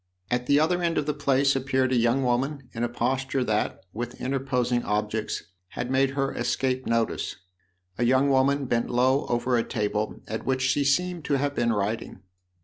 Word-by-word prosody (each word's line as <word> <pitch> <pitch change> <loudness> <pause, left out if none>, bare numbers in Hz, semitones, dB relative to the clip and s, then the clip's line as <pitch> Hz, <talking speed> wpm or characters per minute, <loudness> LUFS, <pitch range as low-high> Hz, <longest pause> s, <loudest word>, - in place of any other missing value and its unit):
At 125 0 0
the 145 +1 +5
other 175 +3 +2
end 170 -1 0
of 150 - +1
the 150 - 0
place 140 -1 +2
appeared 130 -1 +1
a - - +3
young 120 +3 +2
woman 130 +2 -1
in 115 - -3
a 120 - 0
posture 130 +2 -1
that, 110 -3 -1
with 120 +2 -5
interposing 125 -2 0
objects, 105 +1 -2 0.2
had 125 +6 -5
made 135 +1 +3
her 135 0 0
escape 130 +1 -1
notice, 115 -1 0 0.6
a - - +2
young 130 +3 +4
woman 135 +1 +3
bent 120 -2 0
low 130 +3 +2
over 125 +1 +1
a - - +1
table 105 -2 -2
at 110 +1 -4
which 130 -1 0
she 135 +2 +2
seemed 175 +4 +1
to 145 - +1
have 140 +1 -1
been 120 -3 +1
writing. 105 0 -2
130 Hz, 185 wpm, -26 LUFS, 120-135 Hz, 0.6 s, the